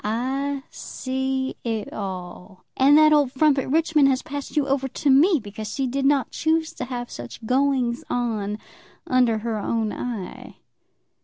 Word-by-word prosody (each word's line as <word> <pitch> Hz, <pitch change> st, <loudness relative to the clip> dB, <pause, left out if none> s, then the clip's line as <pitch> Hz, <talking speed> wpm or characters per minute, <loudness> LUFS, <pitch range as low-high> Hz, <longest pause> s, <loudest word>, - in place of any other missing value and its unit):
I 270 Hz, +5 st, -2 dB
see 265 Hz, 0 st, -3 dB
it 225 Hz, -3 st, -3 dB
all. 185 Hz, -1 st, -7 dB
And 280 Hz, +3 st, +6 dB
that 305 Hz, 0 st, +6 dB
old 290 Hz, -4 st, +3 dB
frump 280 Hz, +1 st, +3 dB
at 265 Hz, -, -3 dB
Richmond 310 Hz, -1 st, +3 dB
has 265 Hz, -1 st, +1 dB
passed 285 Hz, +2 st, -6 dB
you 285 Hz, -2 st, +2 dB
over 270 Hz, -1 st, 0 dB
to 275 Hz, +2 st, 0 dB
me 315 Hz, +5 st, +5 dB
because 210 Hz, -1 st, -7 dB
she 270 Hz, -, -1 dB
did 270 Hz, +2 st, -1 dB
not 275 Hz, -3 st, +2 dB
choose 320 Hz, 0 st, 0 dB
to 250 Hz, -, -5 dB
have 245 Hz, -1 st, -5 dB
such 120 Hz, -, -9 dB
goings 255 Hz, -1 st, +1 dB
on 215 Hz, -4 st, -1 dB, 0.5 s
under 250 Hz, -3 st, +3 dB
her 220 Hz, 0 st, -3 dB
own 220 Hz, +1 st, -1 dB
eye." 225 Hz, -7 st, -6 dB
260 Hz, 160 wpm, -23 LUFS, 225-280 Hz, 0.5 s, And